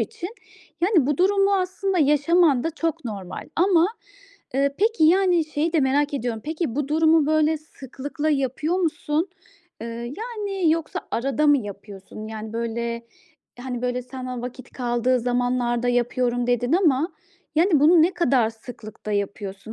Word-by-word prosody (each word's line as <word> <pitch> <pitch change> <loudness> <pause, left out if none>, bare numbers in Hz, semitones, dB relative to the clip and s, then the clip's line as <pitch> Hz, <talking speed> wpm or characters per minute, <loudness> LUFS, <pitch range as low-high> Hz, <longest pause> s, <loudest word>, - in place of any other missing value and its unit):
için, 410 -6 -4 0.5
yani, 350 - +3
bu 295 - +1
durumu 395 +1 +3
aslında 375 0 -1
yaşaman 295 -1 +3
da 325 - 0
çok 330 0 -3
normal. 195 -5 -6
Ama, 350 -1 +4 0.7
ııı, 275 +1 +1
peki, 430 -4 +2
yani, 355 0 +4
şeyi 310 +2 -2
de 320 - +3
merak 285 +2 +1
ediyorum. 235 -4 -2
Peki, 310 -5 -3
bu 290 -2 -1
durumu 315 0 +4
böyle 310 0 +2
sıklıkla 290 +1 -5
yapıyor 285 +4 0
musun? 325 -1 -1 0.5
Iıı, 230 - -5 0.3
yani, 410 -6 -1
yoksa 320 -1 -1
arada 275 +4 0
mı 290 -1 +6
yapıyorsun? 205 -1 -9
Yani, 220 0 -7
böyle, 235 0 -3 0.5
hani, 250 -1 -5
böyle, 250 0 -1
sana 255 -1 -6
vakit 250 0 -8
kaldığı 245 0 0
zamanlarda 245 0 0
yapıyorum, 245 0 0
dedin 245 +2 +1
ama, 325 -3 +2 0.4
yani, 320 -2 +4
bunu 320 +2 +6
ne 350 +3 +2
kadar 260 -10 +2
sıklıkta 220 -2 -9
yapıyorsun? 200 +1 -4
280 Hz, 145 wpm, -23 LUFS, 245-330 Hz, 0.7 s, mı